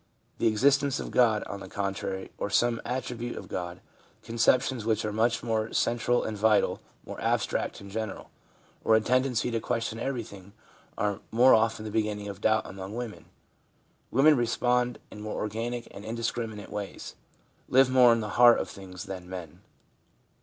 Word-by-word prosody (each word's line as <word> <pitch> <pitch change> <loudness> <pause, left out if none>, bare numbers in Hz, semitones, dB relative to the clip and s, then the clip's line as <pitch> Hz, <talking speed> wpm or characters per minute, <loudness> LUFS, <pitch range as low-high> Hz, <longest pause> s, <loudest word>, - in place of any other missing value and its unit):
The 115 - +3
existence 140 +5 +3
of - - -5
God, 110 -4 +3
on 100 - -6
the - - -9
contrary, 95 -1 -4
or - - -2
some 115 +3 +2
attribute 120 -1 -4
of - - -8
God 90 0 -5 0.2
— - - -32
conceptions 120 +2 +2
w 110 - -3
r 110 - +4
hich - - -4
are 105 - -2
much 115 +1 +1
more 110 -1 -1
central 120 +1 +1
and 110 - -3
vital, 105 +1 +2 0.2
more - - -8
abstract - - -1
and 100 0 -11
general 110 0 -5 0.3
— - - -33
or 110 - +5
a 110 - +4
tendency 125 0 +1
to 115 - 0
ques 115 +1 -1
tion 115 -1 -4
everything 105 -7 -5 0.4
are 105 -1 -1
more 125 +3 +6
often 110 -1 +2
the 105 - -5
beginning 105 -1 -1
of 100 - -8
doubt 110 0 +2
among 95 +2 -7
women. 120 -3 -6 0.8
Women 145 +5 +5
respond 120 0 +1
in 105 - -9
more 105 0 -4
organic 115 +3 -3
and 100 - -10
indiscriminate 115 -1 -4
ways; 105 -1 -6 0.6
live 135 +1 +6
more 125 -2 +7
in 115 -1 +2
the 105 - -4
heart 120 -1 +9
of - - -3
things 95 -1 -9
than 95 -3 -8
men. 90 -5 -8
110 Hz, 180 wpm, -28 LUFS, 105-120 Hz, 0.8 s, heart